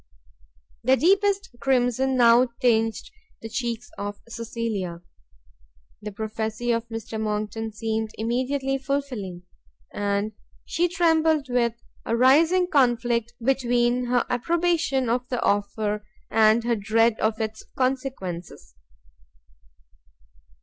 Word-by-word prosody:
The 260 Hz, +3 st, +4 dB
deepest 395 Hz, +4 st, +2 dB
crimson 260 Hz, 0 st, +1 dB
now 240 Hz, +1 st, +6 dB
tinged 225 Hz, -2 st, +1 dB, 0.3 s
the 225 Hz, -, -5 dB
cheeks 240 Hz, +1 st, -3 dB
of 205 Hz, 0 st, -5 dB
Cecilia; 225 Hz, -7 st, -4 dB, 1.0 s
the 210 Hz, -, -6 dB
prophecy 220 Hz, +3 st, -3 dB
of 230 Hz, 0 st, -1 dB
Mr 225 Hz, -1 st, -5 dB
Monckton 215 Hz, +1 st, -3 dB
seemed 220 Hz, +1 st, -2 dB
immediately 265 Hz, +4 st, -1 dB
fulfilling, 250 Hz, -10 st, -3 dB, 0.5 s
and 205 Hz, +1 st, -1 dB, 0.3 s
she 350 Hz, +1 st, +1 dB
trembled 320 Hz, -4 st, +2 dB
with 235 Hz, -2 st, +1 dB, 0.3 s
a 230 Hz, -, -1 dB
rising 320 Hz, +9 st, +5 dB
conflict 240 Hz, -6 st, +1 dB
between 245 Hz, -1 st, +1 dB
her 245 Hz, 0 st, +1 dB
approbation 325 Hz, 0 st, +1 dB
of 245 Hz, +2 st, -1 dB
the 250 Hz, -, -1 dB
offer, 205 Hz, +1 st, 0 dB, 0.3 s
and 220 Hz, +1 st, +4 dB
her 235 Hz, 0 st, +1 dB
dread 220 Hz, +2 st, +2 dB
of 220 Hz, +1 st, 0 dB
its 220 Hz, 0 st, -4 dB
consequences. 255 Hz, -, -3 dB
235 Hz, 105 wpm, -25 LUFS, 220-265 Hz, 1.0 s, now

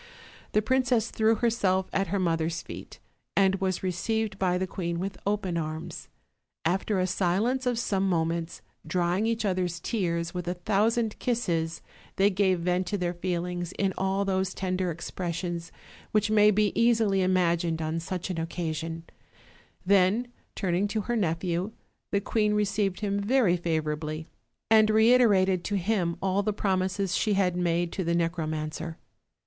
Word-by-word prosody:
The 215 Hz, -, +3 dB
princess 250 Hz, -2 st, +2 dB
threw 220 Hz, +1 st, +3 dB
herself 205 Hz, -5 st, +1 dB
at 195 Hz, 0 st, +1 dB
her 200 Hz, -, -1 dB
mother's 165 Hz, -2 st, 0 dB
feet, -, -, -9 dB, 0.4 s
and 195 Hz, -1 st, +3 dB
was 190 Hz, -1 st, -1 dB
received 200 Hz, +3 st, -1 dB
by 180 Hz, -1 st, +2 dB
the 190 Hz, -, 0 dB
queen 170 Hz, -2 st, -3 dB
with 190 Hz, +2 st, -3 dB
open 200 Hz, -4 st, 0 dB
arms. 155 Hz, 0 st, -5 dB, 0.6 s
After 190 Hz, +4 st, +1 dB
a 185 Hz, -, +2 dB
silence 200 Hz, +8 st, 0 dB
of 245 Hz, -2 st, +1 dB
some 195 Hz, -4 st, 0 dB
mo 165 Hz, -3 st, +2 dB
ments, 165 Hz, 0 st, -4 dB, 0.2 s
drying 180 Hz, +4 st, 0 dB
each 230 Hz, -1 st, -1 dB
other's 180 Hz, -3 st, -1 dB
tears 170 Hz, -4 st, -1 dB
with 180 Hz, -1 st, -4 dB
a 175 Hz, -, -1 dB
thousand 215 Hz, +5 st, +1 dB
kisses, 170 Hz, -10 st, -1 dB, 0.3 s
they 200 Hz, +1 st, +4 dB
gave 185 Hz, -2 st, +2 dB
vent 180 Hz, +1 st, 0 dB
to 205 Hz, -, -1 dB
their 175 Hz, -2 st, -1 dB
feelings 175 Hz, 0 st, -3 dB
in 195 Hz, -1 st, 0 dB
all 190 Hz, +1 st, 0 dB
those 190 Hz, -1 st, 0 dB
tender 185 Hz, -1 st, -1 dB
ex 170 Hz, +1 st, -6 dB
pressions 175 Hz, -1 st, -3 dB, 0.4 s
which 215 Hz, 0 st, +2 dB
may 210 Hz, -1 st, +6 dB
be 210 Hz, 0 st, +2 dB
easily 225 Hz, -4 st, +3 dB
imagined 170 Hz, -3 st, +1 dB
on 160 Hz, +1 st, -2 dB
such 180 Hz, +2 st, -4 dB
an 175 Hz, -, -4 dB
occa 165 Hz, 0 st, -2 dB
sion: 165 Hz, +1 st, -5 dB, 0.8 s
then, 200 Hz, +5 st, +3 dB, 0.3 s
turning 185 Hz, +1 st, 0 dB
to 215 Hz, +1 st, -1 dB
her 240 Hz, +4 st, -2 dB
nephew, 180 Hz, 0 st, -1 dB, 0.4 s
the 200 Hz, -, +2 dB
queen 210 Hz, +1 st, +1 dB
received 200 Hz, -1 st, 0 dB
him 200 Hz, -1 st, 0 dB
very 210 Hz, -3 st, +3 dB
favorably, 155 Hz, -2 st, -2 dB, 0.4 s
and 215 Hz, -1 st, +5 dB
reiterated 215 Hz, -5 st, +4 dB
to 205 Hz, -, -1 dB
him 180 Hz, -3 st, 0 dB
all 195 Hz, +1 st, +2 dB
the 215 Hz, +1 st, 0 dB
promises 190 Hz, -1 st, 0 dB
she 215 Hz, -, +1 dB
had 190 Hz, -3 st, +2 dB
made 175 Hz, -1 st, 0 dB
to 190 Hz, -, -2 dB
the 170 Hz, 0 st, 0 dB
necromancer. 160 Hz, -1 st, -2 dB
185 Hz, 160 wpm, -27 LUFS, 170-205 Hz, 0.8 s, may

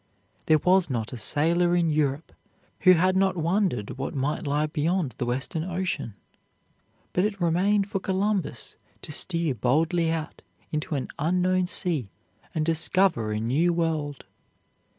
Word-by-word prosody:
There 155 Hz, -, +6 dB
was 180 Hz, +2 st, +3 dB
not 115 Hz, -2 st, -3 dB
a -, -, -3 dB
sailor 170 Hz, +9 st, +1 dB
in 170 Hz, -2 st, +2 dB
Europe 150 Hz, 0 st, 0 dB, 0.5 s
who 185 Hz, 0 st, +7 dB
had 185 Hz, +2 st, +3 dB
not 190 Hz, -1 st, +2 dB
wondered 165 Hz, -, -1 dB
what 135 Hz, -, -4 dB
might 145 Hz, +4 st, -2 dB
lie 145 Hz, +2 st, +1 dB
beyond 155 Hz, 0 st, -1 dB
the 125 Hz, -, -1 dB
Western 130 Hz, +6 st, -2 dB
Ocean, 180 Hz, -, -3 dB, 1.0 s
but 180 Hz, -, +2 dB
it 205 Hz, -1 st, -1 dB
remained 190 Hz, +4 st, +2 dB
for 200 Hz, -1 st, -2 dB
Columbus 195 Hz, +1 st, -2 dB, 0.3 s
to -, -, -7 dB
steer 165 Hz, -1 st, 0 dB
boldly 160 Hz, +8 st, +1 dB
out 160 Hz, -1 st, -4 dB, 0.3 s
into 155 Hz, 0 st, -2 dB
an 135 Hz, -, -3 dB
unknown 180 Hz, +3 st, +1 dB
sea 165 Hz, -, 0 dB, 0.5 s
and 155 Hz, -1 st, 0 dB
discover 165 Hz, -, +2 dB
a 105 Hz, -, -1 dB
new 145 Hz, +10 st, +1 dB
world. 160 Hz, -4 st, -2 dB
165 Hz, 145 wpm, -26 LUFS, 145-185 Hz, 1.0 s, who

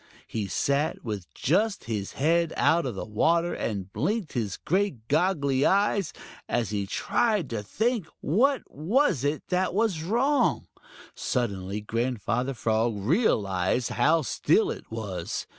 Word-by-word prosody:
He 105 Hz, -3 st, -3 dB
sat 140 Hz, +9 st, 0 dB
with 105 Hz, -5 st, -5 dB
just 205 Hz, -, +1 dB
his 105 Hz, -4 st, -4 dB
head 165 Hz, +3 st, +2 dB
out 160 Hz, +1 st, +3 dB
of 120 Hz, -, -4 dB
water 165 Hz, +11 st, +2 dB
and 100 Hz, -3 st, -4 dB
blinked 185 Hz, -, -1 dB
his 110 Hz, -7 st, -2 dB
great 180 Hz, -, -1 dB
goggly 145 Hz, -4 st, +2 dB
eyes, 200 Hz, -2 st, +2 dB, 0.4 s
as 115 Hz, -4 st, 0 dB
he 100 Hz, -2 st, -2 dB
tried 210 Hz, -, 0 dB
to 110 Hz, -2 st, -2 dB
think 220 Hz, -, -1 dB
what 255 Hz, -, +2 dB
it -, -, -31 dB
was 185 Hz, -, +1 dB, 0.3 s
that 185 Hz, 0 st, 0 dB
was 205 Hz, -7 st, +1 dB
wrong. 245 Hz, -, +1 dB, 0.5 s
Suddenly 100 Hz, -5 st, -2 dB
Grandfather 120 Hz, +3 st, -1 dB
Frog 115 Hz, 0 st, +1 dB
realized 105 Hz, -, +1 dB
how 155 Hz, +6 st, +3 dB
still 415 Hz, -, +2 dB
it -, -, -8 dB
was. -, -, -4 dB
145 Hz, 130 wpm, -27 LUFS, -, 0.5 s, out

